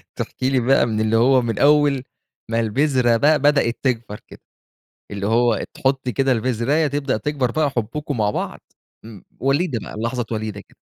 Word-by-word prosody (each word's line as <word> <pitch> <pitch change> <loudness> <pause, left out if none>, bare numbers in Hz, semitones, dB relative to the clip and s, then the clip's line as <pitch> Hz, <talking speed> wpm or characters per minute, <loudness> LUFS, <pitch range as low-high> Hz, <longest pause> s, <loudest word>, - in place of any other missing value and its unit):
تحكي 130 - -3
لي 135 -1 +2
بقى 130 +2 +3
من 110 -2 -1
اللي 110 +1 +1
هو 130 +3 +4
من 115 -2 -3
أول 145 -2 +3 0.5
ما 115 - +1
البذرة 120 +1 +2
بقى 150 +5 +3
بدأت 140 -4 +2
تكبر 115 -5 -2
كده. - - -14 0.7
اللي 100 -1 -4
هو 115 +1 +2
تحُطّي 135 -2 -1
كده 135 -1 +1
البزراية 130 +6 0
تبدأ 140 -2 -1
تكبر 135 0 -1
بقى 150 +3 0
حُبُّكم 135 +4 -4
مع 105 -1 +2
بعض - - -4 0.4
امم 110 -4 -12 0.2
وليدة 135 0 0
بقى، - - -9
لحظات 115 0 -3
وليدة 110 -2 -4
كده. - - -21
125 Hz, 170 wpm, -21 LUFS, 115-140 Hz, 0.7 s, هو